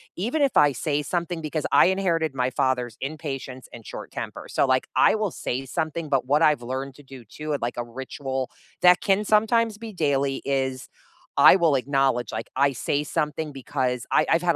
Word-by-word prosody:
even 240 - -1
if 275 - +2
I 145 -1 +7
say 145 +3 -1
something 170 +2 -3
because 155 0 -3
I - - +6
inherited 170 -6 0
my 125 -1 0
father's 125 -3 -1
impatience 135 -3 -6
and 115 -2 -11
short - - -8
temper, - - -6
so, - - +2
like, 130 -1 +1
I - - +5
will 215 -3 -1
say 135 -2 -4
something, 160 +2 -3
but 135 -3 +1
what 145 +4 +2
I've 150 -5 +4
learned 135 0 -4
to 145 - -15
do, 130 -3 -12
too, 150 +8 -5
of, 145 - -2
like, 120 +1 -3
a 120 - -1
ritual- 130 +2 -5 0.3
that 180 0 +6
can 200 +2 +1
sometimes 220 +1 +2
be 225 0 -8
daily- 140 -5 0
is, 130 -2 -1 0.5
I - - +8
will 165 -5 +3
acknowledge, 135 -3 +1
like, 110 +1 -5
I 140 +1 +3
say 145 +3 -1
something 150 +1 -2
because, 130 -2 -2
I - - +4
I've 165 - +3
had 170 - +4
140 Hz, 200 wpm, -24 LUFS, 130-165 Hz, 0.5 s, I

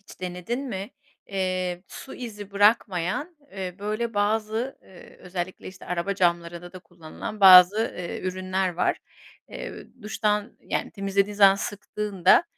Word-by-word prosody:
Hiç 200 - -16
denedin 180 +8 -4
mi? 210 -5 -5 0.4
Eee, 185 -2 -2
su 270 - -9
izi 210 -5 -8
bırakmayan, 205 - +1 0.2
eee, 185 -2 -5
böyle, 215 +2 -3
bazı, 220 +4 0
eee, 185 -2 -16
özellikle, 180 0 -6
işte, 185 0 -13
araba 180 +3 -2
camlarında 175 -1 -1
da 185 - -9
kullanılan 175 +4 -9
bazı, 185 +2 +9 0.2
eee, 175 - -5
ürünler 185 0 -1
var. 180 - +1 0.5
Eee, - - -8 0.2
duştan, 210 +1 -1
yani, - - -3
temizlediğin 200 0 -1
zaman 195 -1 +7
sıktığında, 205 - +1
195 Hz, 130 wpm, -25 LUFS, 180-210 Hz, 0.5 s, bazı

